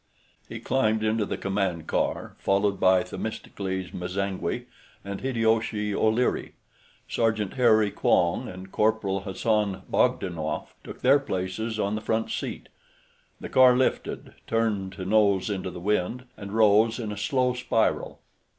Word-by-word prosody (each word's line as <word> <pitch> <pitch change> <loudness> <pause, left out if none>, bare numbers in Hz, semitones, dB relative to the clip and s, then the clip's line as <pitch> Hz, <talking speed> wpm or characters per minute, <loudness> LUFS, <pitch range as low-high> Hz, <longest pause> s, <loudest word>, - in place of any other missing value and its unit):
He - - -6
climbed 110 -4 +1
into 110 -1 +1
the - - -3
command 95 -5 -1
car, - - -2
followed 100 0 +1
by 95 0 +4
Themistocles 95 -2 -5
M'zangwe 95 +2 -3 0.4
and 100 0 -5
Hideyoshi 110 -4 0
O'Leary. 110 +4 +1 0.5
Sergeant 110 -4 0
Harry 110 -5 +4
Quong 85 -2 +1
and 95 +1 -10
Corporal 105 -3 +1
Hassan 100 +1 -1
Bogdanoff 80 -5 -1
took - - -10
their 135 +3 +5
places 110 0 -3
on 100 0 0
the 110 - -2
front 110 +1 -1
seat; - - -4 0.7
the - - -6
car 130 -1 +6
lifted, 130 - -1
turned 105 -4 0
to 95 -1 -6
nose 100 -1 +3
into 95 -2 -3
the 90 - -8
wind, 105 +6 -1
and 100 -1 -8
rose 110 +1 +4
in 110 -4 -4
a - - -4
slow 125 +5 +1
spiral. 125 -3 -1
105 Hz, 135 wpm, -26 LUFS, 95-110 Hz, 0.7 s, car